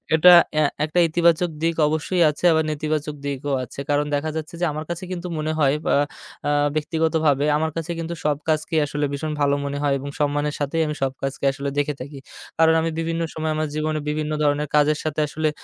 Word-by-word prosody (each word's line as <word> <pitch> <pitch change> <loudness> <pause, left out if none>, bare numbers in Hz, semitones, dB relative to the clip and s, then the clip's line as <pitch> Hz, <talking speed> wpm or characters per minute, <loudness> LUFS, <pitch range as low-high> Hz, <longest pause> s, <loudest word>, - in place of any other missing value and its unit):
এটা 180 +3 +8 0.2
অ্যা 155 -1 +4 0.2
একটা 155 +3 0
ইতিবাচক 170 +1 +2
দিক 165 0 +1
অবশ্যই 160 +4 0
আছে। 150 - -7
আবার 160 -1 +3
নেতিবাচক 150 0 -2
দিকও 140 0 -2
আছে। 125 - -10
কারণ 145 0 +2
দেখা 150 +2 -1
যাচ্ছে 160 +1 -5
যে, - - +3
আমার 155 +1 -5
কাছে 175 +1 -4
কিন্তু 180 -1 -4
মনে 155 +1 -1
হয় 140 -2 +4
অ্যা - - +3 0.8
ব্যক্তিগতভাবে 155 -2 +1
আমার 160 +1 -1
কাছে 165 +1 -3
কিন্তু 165 +1 -4
সব 150 -1 +1
কাজকেই 155 +1 +1
আসলে 145 0 -2
ভীষণ 155 +2 -3
ভালো 140 0 +3
মনে 140 0 -3
হয় 145 -1 +2
এবং 140 +2 -6
সম্মানের 145 0 0
সাথেই 145 +3 0
আমি 150 - -3
সব 135 - +1
কাজকে 135 0 -4
আসলে 140 +1 -4
দেখে 145 +1 +1
থাকি। 140 +1 -8 0.4
কারণ 160 0 +5
আমি 165 - 0
বিভিন্ন 165 0 -2
সময়ে 160 0 -2
আমার 155 0 -1
জীবনে 155 0 -1
বিভিন্ন 150 0 -2
ধরনের 145 0 +1
কাজের 150 0 +4
সাথে 155 -1 -2
আসলে 155 +1 -1
155 Hz, 200 wpm, -22 LUFS, 145-160 Hz, 0.8 s, এটা